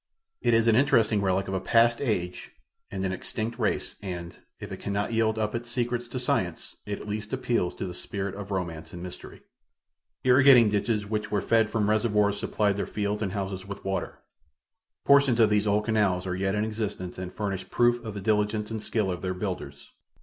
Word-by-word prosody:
It 120 - +3
is 115 0 +3
an 115 -1 +5
interesting 115 -5 +3
relic 95 0 +1
of 95 - -3
a 95 - 0
past 115 +4 +3
age 90 -9 -2 0.4
and 95 -1 -3
an 95 - 0
extinct 115 +5 -4
race 110 - -1
and, 85 -3 -6 0.2
if - - -8
it - - -6
cannot 100 +2 -2
yield 110 -1 +2
up 105 -1 -1
its 120 0 -4
secrets 120 0 -2
to 120 - -5
science, 125 - -1
it 105 - -3
at - - -9
least 105 +2 -4
appeals 120 -8 0
to - - -4
the 90 - -5
spirit 100 +1 -4
of 100 -1 -7
romance 85 -5 -4
and 90 0 -7
mystery. 90 - -10 0.8
Irrigating 130 -3 +7
ditches 105 +1 0
which 105 +1 -2
were 105 - +1
fed 110 +1 +2
from 105 -2 0
reservoirs 105 -2 +2
supplied 100 -2 0
their - - -2
fields 105 0 -2
and 95 -3 -2
houses 95 -1 -4
with 100 -1 -8
water. 95 0 -2 0.9
Portions 140 -4 +5
of 110 -2 +5
these 105 0 +2
old 105 +1 +2
canals 100 -5 +1
are 90 -1 -2
yet 95 +2 0
in 105 +1 +1
existence 105 -5 -4
and 90 -1 -5
furnish 95 -2 -4
proof 120 0 +2
of 110 -3 -6
the 100 - -4
diligence 105 +1 0
and 110 -1 -3
skill 105 -3 -1
of 90 - -4
their 95 -1 -2
builders. 95 -1 -5
105 Hz, 200 wpm, -27 LUFS, 95-115 Hz, 0.9 s, Irrigating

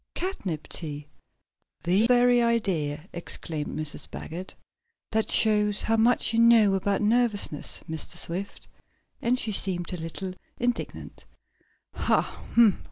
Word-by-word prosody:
"Catnip 195 - -4
tea! 150 -2 -5 0.7
The 190 +6 +3
very 245 0 +4
idea!" 185 -10 0
exclaimed 160 -3 -3
Mrs. 155 -1 -4
Baggert. 175 +4 -7 0.6
"That 220 0 0
shows 210 -2 +4
how 225 - +2
much 230 +1 +2
you 225 - +2
know 230 -4 +6
about 195 +1 0
nervousness, 215 -8 +1
Mr. 160 -1 -4
Swift," 185 +4 -4 0.5
and 245 +2 +1
she 225 - -2
seemed 185 -3 -1
a - - -3
little 175 +3 -5 0.2
indignant. 245 0 -4 0.7
"Ha! - - 0
200 Hz, 115 wpm, -26 LUFS, 170-230 Hz, 0.7 s, know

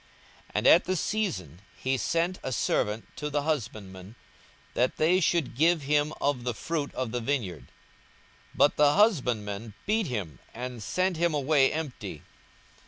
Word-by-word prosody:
42:020:010 - - -22
And - - +2
at 170 - +7
the 185 - 0
season 100 - -2 0.2
he 130 +1 0
sent 170 +7 0
a - - -4
servant 110 -2 0
to 150 - -3
the 145 0 -1
husbandmen, 105 - -4 0.6
that 125 - +1
they 170 +4 +4
should 165 -7 +1
give 160 +2 +3
him 145 +2 +2
of 140 -4 0
the 120 -2 -2
fruit 155 +1 -3
of 130 -3 -2
the 125 +1 -2
vineyard: 100 - -2 0.9
but 145 - +4
the 145 -1 +5
husbandmen 115 - +1
beat 215 -1 +1
him, 100 - -4 0.2
and 125 0 -6
sent 185 - 0
him 170 -1 +1
away 140 -1 +3
empty. 125 - -5
135 Hz, 155 wpm, -28 LUFS, 110-160 Hz, 0.9 s, at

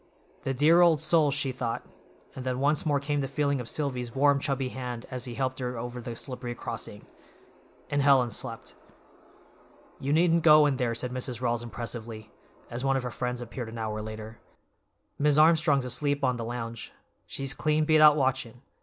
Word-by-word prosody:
The 135 - 0
dear 160 +6 +5
old 170 -3 +5
soul—she 150 -3 +2
thought, 115 -2 -4 0.5
and 130 - -6
then 130 0 -2
once 145 +3 +1
more 145 -2 +2
came 145 +1 -1
the 135 - -2
feeling 140 -1 0
of 115 - -3
Silvy's 125 -5 -3
warm, 140 +1 +4
chubby 135 -2 -2
hand 125 -2 -6
as 125 -1 -4
he 120 -2 -6
helped 130 0 -2
her 125 -1 -3
over 120 +1 -5
the 120 -1 -6
slippery 125 -1 -5
crossing—and 145 +4 -7
Helen 135 -4 +4
slept. - - -4 1.3
"You 140 - -2
needn't 165 +2 +3
go 155 -1 +7
in 140 -3 +1
there," 120 -3 -1
said 125 +1 -3
Mrs. 125 -1 -4
Rawls 120 -2 0
impressively, 115 -2 -7 0.4
as 120 +2 -4
one 135 0 +2
of 130 - -3
her 125 - -4
friends 125 0 -3
appeared 120 0 -6
an 115 - -8
hour 110 -1 -3
later. 110 +1 -8 0.8
"Mis' 145 0 +3
Armstrong's 155 -4 +4
asleep 140 +3 -1
on 130 -1 +2
the 115 - -4
lounge. 115 -1 -6 0.4
She's 135 -1 -3
clean 155 +3 +1
beat 155 0 +4
out 150 -1 +8
watchin'. 130 -3 -1
130 Hz, 180 wpm, -28 LUFS, 120-145 Hz, 1.3 s, out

